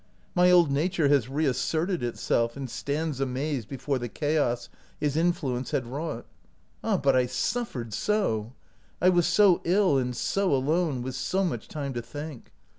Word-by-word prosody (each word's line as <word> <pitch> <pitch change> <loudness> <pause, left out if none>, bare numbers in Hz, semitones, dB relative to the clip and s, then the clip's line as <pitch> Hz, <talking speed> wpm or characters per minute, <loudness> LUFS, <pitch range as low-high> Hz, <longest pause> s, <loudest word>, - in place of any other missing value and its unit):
My 180 0 +5
old 175 -5 +5
nature 155 +1 +1
has 135 -4 +3
reasserted 155 +5 0
itself, 115 0 0
and 135 -1 -4
stands 145 +3 -3
amazed 135 -2 -2
before 135 0 -2
the 120 -1 -4
chaos 145 -5 0 0.3
his 145 -1 0
in 170 +2 +3
fluence 130 -8 -4
had 130 - 0
wrought. 145 +7 -5 0.6
Ah, 215 -3 +1
but 135 -4 +2
I 125 -1 +3
suffered 130 - -2
so! 120 - 0 0.5
I 180 - +5
was 175 -2 +3
so 185 +1 +5
ill, 180 -5 +3
and 125 -1 -2
so 195 +4 +1
alone, 145 -1 0
with 130 +1 -4
so 185 +9 0
much 120 - -3
time 140 -3 -4
to 120 - -3
think! 145 +2 -8
145 Hz, 165 wpm, -27 LUFS, 125-175 Hz, 0.6 s, My